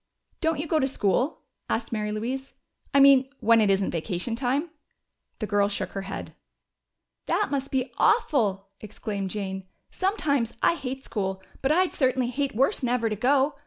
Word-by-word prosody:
"Don't 320 -3 0
you 305 - -2
go 315 0 +1
to 265 - +2
school?" 255 +3 0 0.3
asked 225 0 -1
Mary 210 -2 -2
Louise. 255 +6 -4 0.4
"I 280 - +4
mean 275 -1 +7
when 230 0 +5
it 210 - +3
isn't 195 0 +2
vacation 180 +6 -2
time?" 275 +6 -1 0.7
The 215 - -3
girl 205 -1 +2
shook 200 - -3
her 195 - -4
head. 195 0 -6 0.9
"That 420 - +1
must 275 -1 -1
be 260 -1 -1
awful!" 205 - +2
exclaimed 205 -2 -4
Jane. 190 -2 -4 0.2
"Sometimes 285 - 0
I - - +5
hate 270 -4 -5
school, 190 -2 -3 0.2
but 270 - +2
I'd 365 +3 +3
certainly 255 -2 +1
hate 275 -2 -2
worse 270 - +2
never 240 -3 0
to - - 0
go. 270 +6 +2
245 Hz, 165 wpm, -26 LUFS, 205-275 Hz, 0.9 s, mean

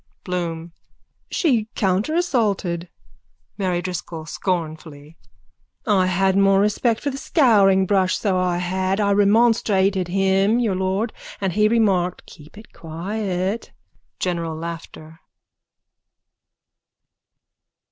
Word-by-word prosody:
BLOOM: 170 -2 -4 0.6
She 240 - +1
counterassaulted. 200 - 0 0.7
MARY 180 -2 -1
DRISCOLL: 170 -3 -5
(Scornfully.) 160 -3 -4 0.7
I 195 -4 +3
had 190 +1 +1
more 195 0 +4
respect 215 +3 +1
for 285 - -2
the 270 - -6
scouringbrush, 195 - +3
so 200 -3 0
I 180 -1 0
had. 185 +2 -1
I 200 -1 +2
remonstrated 200 -3 +3
with 175 - -5
him, 195 +3 +2
Your 225 -5 +1
lord, 190 +4 -1 0.3
and 190 -3 -1
he 210 +1 +3
remarked: 195 -6 +1
keep 155 +2 -16
it 215 - -14
quiet. 190 +4 -4 0.5
_(General 170 -3 -2
laughter.) 165 -1 -8
190 Hz, 100 wpm, -21 LUFS, 175-210 Hz, 0.7 s, more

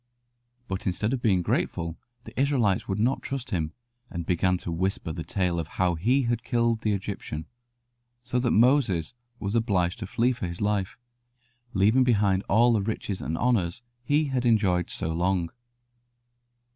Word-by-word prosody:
But 95 0 -4
instead 105 +6 0
of 130 - -2
being 95 -7 +2
grateful 85 0 -1 0.3
the - - -11
Israelites 125 -9 +2
would 95 - -1
not 120 +5 +1
trust 135 -3 -5
him, 80 -5 -1 0.4
and 85 -2 -5
began 90 +1 +2
to 90 - -6
whisper 90 -1 -1
the 80 0 -5
tale 90 -2 0
of 80 - -3
how 90 -1 +3
he 120 +12 +2
had 120 -1 -1
killed 115 -3 +1
the 105 -2 +1
Egyptian, 95 -6 -4 0.8
so 125 0 -1
that 120 -1 +1
Moses 115 - +3 0.3
was 100 0 -3
obliged 100 -6 +1
to - - -5
flee 120 +2 +2
for 120 -7 -3
his 85 0 -6
life, 100 -2 -1 0.8
leaving 110 +7 +4
behind 100 -6 +3
all 120 +4 +5
the 110 - +2
riches 100 -2 -3
and 80 - -2
honours 115 -4 0 0.2
he 145 +5 +2
had 130 -2 0
enjoyed 100 -7 +2
so 80 - -3
long. 85 0 0
100 Hz, 165 wpm, -27 LUFS, 90-120 Hz, 0.8 s, all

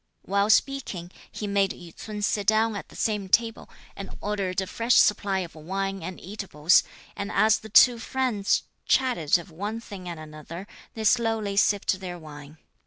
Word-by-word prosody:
While 200 +2 +1
speaking, 220 -8 +1 0.2
he 210 - -5
made 200 -1 +2
Yü 170 -2 -13
ts'un 210 -1 -6
sit 205 -1 0
down 220 0 +3
at 200 - -7
the - - -15
same 210 -3 -1
table, 225 +2 +1 0.3
and 200 - -7
ordered 200 -3 -2
a 190 - -1
fresh 230 +5 +1
supply 200 -2 +3
of 170 -3 -7
wine 195 +4 -3
and 185 - -6
eatables; 185 -4 +2 0.3
and 200 - -4
as 215 0 +4
the 220 - -11
two 240 +2 +7
friends 245 -5 0 0.2
chatted 240 - +3
of 175 +1 -11
one 205 +7 -4
thing 195 -5 -9
and 170 -2 -6
another, 155 +4 -9 0.3
they 220 - -4
slowly 220 -3 +1
sipped 200 -1 +2
their 180 -2 -6
wine. 150 -1 -12
200 Hz, 175 wpm, -26 LUFS, 180-220 Hz, 0.3 s, two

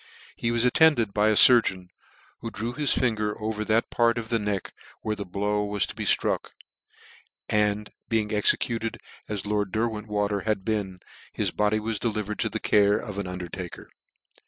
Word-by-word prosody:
He 115 - -2
was 115 +1 +1
attended 125 -6 +4
by 105 +1 +2
a 110 - +3
furgeon, 95 -7 +5 0.5
who 115 - -5
drew 115 +2 -4
his 145 0 0
finger 105 -4 0
over 110 0 -3
that 110 +2 +1
part 115 0 +2
of 115 -1 -5
the 115 - +1
neck 105 -3 -3 0.3
where 110 -1 -1
the 100 -2 -7
blow 105 +3 -1
was 105 -1 0
to - - -8
be - - -5
(truck; - - +2 0.9
and 105 0 0 0.2
being 110 -1 0
executed 115 +2 +1 0.3
as 105 -2 -4
lord 105 -2 -1
Derwentwater 105 -2 -1
had 105 -3 -1
been, 100 -5 -2 0.3
his - - 0
body 105 +1 +1
was 110 -1 -3
delivered 105 -2 -3
to - - 0
the - - -4
care 105 0 +3
of 100 -1 -6
an 100 - -3
under 90 -1 -5
taker. 90 +1 -8
105 Hz, 175 wpm, -26 LUFS, 100-115 Hz, 0.9 s, furgeon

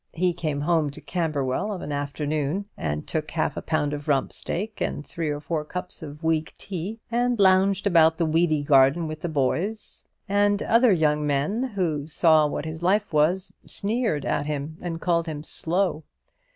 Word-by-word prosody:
He 180 +1 +1
came 155 -4 -2
home 160 -1 +2
to 140 - -10
Camberwell 155 0 -1
of 195 - -5
an 145 - -5
afternoon, 145 +5 -2
and 75 -1 -3
took 155 -1 -3
half 160 - -1
a - - -4
pound 150 -2 -1
of 145 0 -6
rump 140 -3 +1
steak 215 +4 -4
and 145 - -2
three 165 -2 -3
or 145 0 -2
four 155 +1 -2
cups 180 +4 -5
of 150 0 -9
weak 160 -1 0
tea, 195 +4 -5
and 245 +1 +1
lounged 195 0 +4
about 165 -4 +5
the 170 - +1
weedy 155 -1 +2
garden 140 +3 +4
with 155 0 -6
the 175 - -2
boys; 165 +9 -2 0.2
and 205 0 +2
other 230 +1 +4
young 150 -4 +2
men 145 - 0
who 155 -6 -1
saw 155 -1 +4
what 145 - -4
his 160 +1 -6
life 200 +2 +1
was, 170 +6 +2
sneered 215 - 0
at 145 0 -1
him 150 +2 -4
and 165 -2 -4
called 170 -1 +1
him 150 -2 -5
"slow." 170 0 0
160 Hz, 180 wpm, -25 LUFS, 150-185 Hz, 0.2 s, about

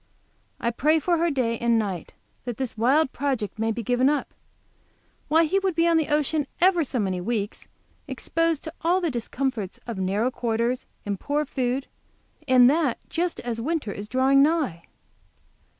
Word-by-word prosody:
I 235 - 0
pray 300 +7 +2
for 340 +2 +1
her 340 +1 +2
day 245 -6 0
and 235 -1 +2
night, 195 -6 -3 0.3
that 245 -3 -4
this 260 -3 -3
wild 260 +6 +3
project 250 -8 -2
may 225 0 +1
be 230 +1 -4
given 250 +4 +2
up. 295 -2 -1 0.9
Why, 320 +2 +4
he 375 +5 +2
would 380 -3 -1
be 335 +1 +3
on 335 -1 +4
the 315 - +1
ocean 295 -1 +1
ever 355 -2 +4
so 265 -2 -3
many 190 -5 -1
weeks, 210 0 -3 0.4
exposed 330 -2 -1
to 315 - -6
all 350 +3 +2
the 340 -4 -1
discomforts 240 -4 -3
of 230 -5 -5
narrow 200 +6 0
quarters 235 +1 -1 0.2
and 200 -2 -3
poor 295 +1 -1
food, 260 -1 -1 0.6
and 255 -2 +7
that 285 -3 +2
just 345 +1 -2
as 235 -1 -3
winter 295 -5 -2
is 205 +1 -7
drawing 265 +2 +4
nigh! 285 - +1
260 Hz, 170 wpm, -25 LUFS, 230-315 Hz, 0.9 s, and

